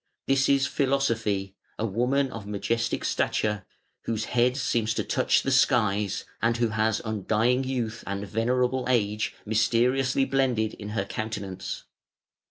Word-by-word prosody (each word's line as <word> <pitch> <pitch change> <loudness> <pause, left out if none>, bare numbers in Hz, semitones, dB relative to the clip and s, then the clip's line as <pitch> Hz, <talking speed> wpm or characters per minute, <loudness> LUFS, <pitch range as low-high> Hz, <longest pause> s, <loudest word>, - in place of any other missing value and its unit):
This 135 0 +2
is 140 -1 +4
Philosophy, 115 -10 0 0.2
a 110 - -1
woman 125 +6 +1
of 110 -3 -7
majestic 115 +3 -1
stature, 105 -3 0 0.4
whose 110 -1 -1
head 125 +2 +2
seems 115 -4 0
to - - 0
touch - - +2
the 135 - 0
skies, 105 -7 +2 0.2
and 115 +1 +2
who 120 -1 +1
has 110 0 0
undying 110 +4 +1
youth 120 -4 -3
and 100 +1 -3
venerable 125 +4 0
age 105 -4 +1
mysteriously 125 +5 +2
blended 125 -6 +1
in 105 -1 -8
her 100 - 0
countenance. 100 -3 -5
115 Hz, 135 wpm, -26 LUFS, 105-130 Hz, 0.4 s, is